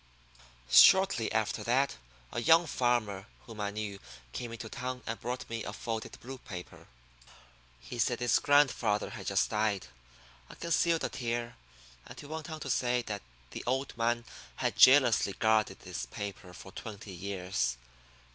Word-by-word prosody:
Shortly 190 Hz, -, +7 dB
after 110 Hz, -1 st, 0 dB
that 135 Hz, +4 st, +1 dB, 0.3 s
a 120 Hz, -, -2 dB
young 165 Hz, +7 st, +6 dB
farmer 120 Hz, -8 st, 0 dB, 0.2 s
whom 110 Hz, -3 st, -8 dB
I 100 Hz, -, -1 dB
knew 100 Hz, -1 st, -5 dB, 0.3 s
came 120 Hz, -2 st, -5 dB
into 115 Hz, -1 st, -7 dB
town 125 Hz, +2 st, -5 dB
and 115 Hz, -, -4 dB
brought 125 Hz, +1 st, -4 dB
me 115 Hz, -1 st, -4 dB
a -, -, -5 dB
folded 110 Hz, 0 st, -5 dB
blue 130 Hz, +1 st, -8 dB
paper. 90 Hz, -6 st, -9 dB, 0.9 s
He 120 Hz, -, -8 dB
said 120 Hz, +2 st, +1 dB
his 120 Hz, 0 st, +3 dB
grandfather 130 Hz, -7 st, +3 dB
had -, -, -8 dB
just -, -, +1 dB
died. 105 Hz, -2 st, 0 dB, 0.6 s
I -, -, -11 dB
concealed 170 Hz, 0 st, +1 dB
a -, -, 0 dB
tear, 120 Hz, -1 st, -3 dB, 0.5 s
and -, -, -11 dB
he -, -, -9 dB
went 155 Hz, +1 st, -6 dB
on 155 Hz, -1 st, -6 dB
to 140 Hz, -, -5 dB
say 125 Hz, -1 st, +1 dB
that 105 Hz, -3 st, -5 dB, 0.3 s
the -, -, -6 dB
old 135 Hz, +2 st, -1 dB
man 120 Hz, 0 st, 0 dB, 0.3 s
had -, -, -1 dB
jealously 130 Hz, -7 st, +6 dB
guarded 110 Hz, +1 st, +1 dB
this -, -, -5 dB
paper 100 Hz, -2 st, -7 dB
for 95 Hz, +1 st, -11 dB
twenty 100 Hz, -1 st, -8 dB
years. 90 Hz, -9 st, -2 dB
115 Hz, 155 wpm, -31 LUFS, 105-130 Hz, 0.9 s, Shortly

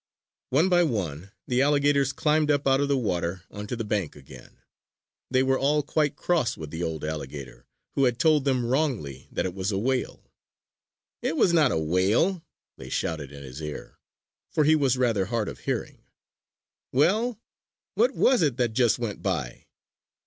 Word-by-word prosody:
One 150 Hz, +8 st, +3 dB
by 175 Hz, -1 st, +4 dB
one, 95 Hz, -, -2 dB, 0.2 s
the 125 Hz, +1 st, +1 dB
alligators 140 Hz, -1 st, +3 dB
climbed 150 Hz, +2 st, +1 dB
up 145 Hz, -1 st, +2 dB
out 135 Hz, 0 st, +4 dB
of 145 Hz, -, +1 dB
the 140 Hz, -1 st, +2 dB
water 90 Hz, -6 st, -2 dB
onto 105 Hz, +3 st, -5 dB
the 115 Hz, -, -3 dB
bank 105 Hz, -6 st, -2 dB
again. 70 Hz, -2 st, -14 dB, 0.7 s
They 130 Hz, 0 st, +3 dB
were 135 Hz, 0 st, +2 dB
all 145 Hz, +2 st, +2 dB
quite 150 Hz, 0 st, 0 dB
cross 155 Hz, -8 st, 0 dB
with 80 Hz, -2 st, -8 dB
the 80 Hz, -, -5 dB
old 80 Hz, -3 st, -3 dB
alligator 75 Hz, -3 st, -7 dB, 0.3 s
who 135 Hz, -, +2 dB
had 120 Hz, -2 st, +1 dB
told 155 Hz, 0 st, +3 dB
them 130 Hz, -3 st, +1 dB
wrongly 120 Hz, -, -1 dB
that -, -, -1 dB
it 90 Hz, -, -3 dB
was 95 Hz, +2 st, -2 dB
a 95 Hz, -, -1 dB
whale. 130 Hz, +5 st, -2 dB, 0.9 s
"It 160 Hz, -, -1 dB
was 170 Hz, -, +4 dB
not 155 Hz, -6 st, +4 dB
a -, -, 0 dB
whale!" 95 Hz, -, +1 dB, 0.3 s
they -, -, -10 dB
shouted 75 Hz, -4 st, -3 dB
in 70 Hz, -1 st, -10 dB
his 65 Hz, +3 st, -9 dB
ear 75 Hz, -1 st, -7 dB, 0.5 s
for 155 Hz, -, +1 dB
he 155 Hz, +2 st, +5 dB
was 135 Hz, -4 st, +2 dB
rather 115 Hz, -6 st, +1 dB
hard 110 Hz, 0 st, -1 dB
of -, -, -7 dB
hearing. -, -, -3 dB, 0.9 s
"Well, 215 Hz, -, +2 dB, 0.5 s
what -, -, +2 dB
was 255 Hz, -6 st, +4 dB
it 140 Hz, -6 st, +1 dB
that 120 Hz, -3 st, 0 dB
just 120 Hz, -1 st, +3 dB
went 115 Hz, -4 st, -4 dB
by?" -, -, -3 dB
125 Hz, 175 wpm, -26 LUFS, 90-145 Hz, 0.9 s, he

